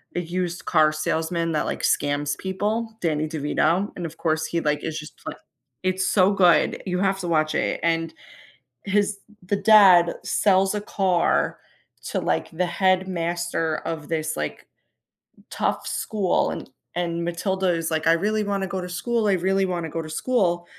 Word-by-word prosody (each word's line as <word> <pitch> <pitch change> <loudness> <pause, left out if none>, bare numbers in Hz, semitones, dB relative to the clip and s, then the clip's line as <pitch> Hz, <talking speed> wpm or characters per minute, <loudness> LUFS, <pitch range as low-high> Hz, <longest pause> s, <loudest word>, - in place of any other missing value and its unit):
a 175 - 0
used-car 170 -3 +1
salesman 165 +2 -1
that, 155 - 0
like, - - -3
scams 145 0 +1
people 215 +4 -3
Danny 155 -2 0
DeVito, 160 +5 0
and 175 - -5
of 160 - -12
course 160 -1 0
he, 170 - -1
like, 150 -1 0
it's 160 -1 -3
just 150 - -11
pl - - -5 0.5
It's 185 0 0
so 195 0 +4
good, 175 -5 +3
you 180 - -1
have 195 0 +1
to 175 - -4
watch 155 -2 +1
it - - 0
and 165 -1 0 0.7
his 205 0 +1 0.2
the 200 +3 -1
dad 195 -5 +6
sells 195 0 +2
a 210 - -1
car 190 -4 +1 0.5
to, - - -1
like, - - -1
the 180 +2 0
headmaster 175 -3 0
of 155 -3 -5
this, 160 -1 -2
like, - - -5 0.8
tough - - -2
school, 200 -5 0
and - - -7 0.3
and 170 -1 -2
Matilda 190 +2 -1
is 165 -1 -1
like, 160 0 0
"I 165 - +6
really 210 +5 0
wanna 195 -1 -1
go 185 0 -3
to 180 - -6
school, 215 +5 -1
I 200 - +3
really 190 +2 +1
wanna 170 -3 -3
go 165 +1 -3
to 155 - -8
school," 175 -3 0
175 Hz, 165 wpm, -24 LUFS, 165-190 Hz, 0.8 s, dad